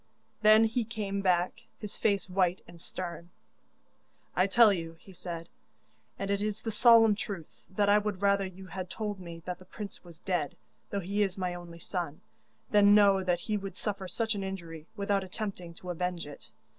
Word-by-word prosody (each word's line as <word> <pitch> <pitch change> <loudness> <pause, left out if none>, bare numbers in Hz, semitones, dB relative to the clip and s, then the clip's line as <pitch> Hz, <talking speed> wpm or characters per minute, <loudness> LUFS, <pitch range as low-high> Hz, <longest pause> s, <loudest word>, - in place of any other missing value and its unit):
Then 215 +1 +7
he 225 +2 +1
came 210 -3 -3
back, 180 +3 +1 0.2
his 210 -1 -7
face 200 -4 +1
white 185 -1 +1
and 170 -1 -13
stern. 175 -1 -6 1.1
'I 185 - +4
tell 215 +1 +6
you,' 165 -2 -4
he 195 - -15
said, 170 -2 -6 0.7
'and 195 0 -2
it 200 0 +1
is 210 0 -2
the 225 - -2
solemn 225 -1 +7
truth, 200 -5 -6
that 200 +1 +1
I 205 +1 +6
would 210 -2 -3
rather 200 0 +3
you 190 +1 -11
had 185 -1 -6
told 210 -2 -4
me 170 -2 -9
that 180 -1 -4
the 185 - -14
prince 200 +1 -8
was 170 -3 -13
dead, 175 -6 -1 0.3
though 200 - -2
he 200 +3 -1
is 195 -2 +1
my 180 -2 -1
only 175 -1 -9
son, 170 -3 -4 0.5
than 205 -1 +7
know 200 -2 +6
that 175 -1 +1
he 215 -1 -1
would 195 -2 -6
suffer 200 -3 -3
such 225 +4 -1
an 200 -2 -3
injury 170 -5 -6
without 200 -1 0
attempting 185 -3 -5
to 180 +2 -6
avenge 180 0 -2
it. 145 -1 -11
195 Hz, 190 wpm, -30 LUFS, 175-205 Hz, 1.1 s, Then